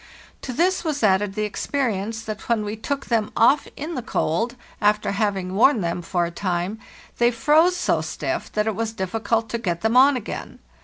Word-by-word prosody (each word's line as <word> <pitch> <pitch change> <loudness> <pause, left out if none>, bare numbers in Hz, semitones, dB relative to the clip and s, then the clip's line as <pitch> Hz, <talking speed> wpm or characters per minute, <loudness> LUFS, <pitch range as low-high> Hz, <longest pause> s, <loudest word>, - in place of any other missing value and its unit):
To 255 - -5
this 350 +8 +1
was 300 -6 -2
added 195 -1 +2
the 215 - -1
experience 225 -1 -2
that 215 0 -7
when 220 -3 +1
we 210 +1 -3
took 275 +5 -3
them 225 -3 0
off 275 +5 +4
in 310 +4 -5
the 255 - -3
cold, 230 +2 -1 0.3
after 210 0 +2
having 200 -3 -1
worn 225 +3 +4
them 170 0 -2
for 175 0 0
a 170 - -5
time, 180 +3 -2 0.4
they 240 0 +5
froze 305 +9 +3
so - - +1
stiff - - -4
that 210 0 +1
it 220 - 0
was 225 +2 -3
difficult 225 +3 -1
to 235 - -2
get 175 -6 -2
them 225 +2 +1
on 265 +1 +6
again. 225 - -6
220 Hz, 195 wpm, -23 LUFS, 200-250 Hz, 0.4 s, on